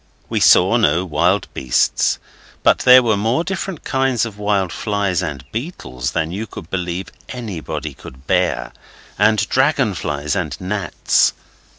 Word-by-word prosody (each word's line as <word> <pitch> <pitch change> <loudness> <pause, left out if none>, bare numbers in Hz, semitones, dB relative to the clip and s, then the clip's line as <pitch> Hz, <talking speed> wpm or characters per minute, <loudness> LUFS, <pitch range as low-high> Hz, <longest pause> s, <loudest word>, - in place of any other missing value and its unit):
We - - 0
saw - - +5
no 90 +3 +2
wild 90 +4 +1
beasts, 65 -2 +1 0.5
but - - +4
there 125 0 +7
were 110 -3 +2
more 115 +10 0
different 190 -2 -4
kinds 130 -3 +1
of 105 -3 -9
wild 100 -4 0
flies 100 -3 -1
and 70 -4 -5
beetles 85 - -5
than 80 +1 -1
you 105 +5 -4
could 85 -3 -10
believe 90 0 -3 0.2
anybody 110 -10 -5
could 65 +2 -13
bear, - - 0 0.5
and 105 +1 +3
dragon 130 -4 +2
flies 75 -3 -3
and - - -3
gnats. 100 +1 +1
100 Hz, 145 wpm, -19 LUFS, 85-120 Hz, 0.5 s, there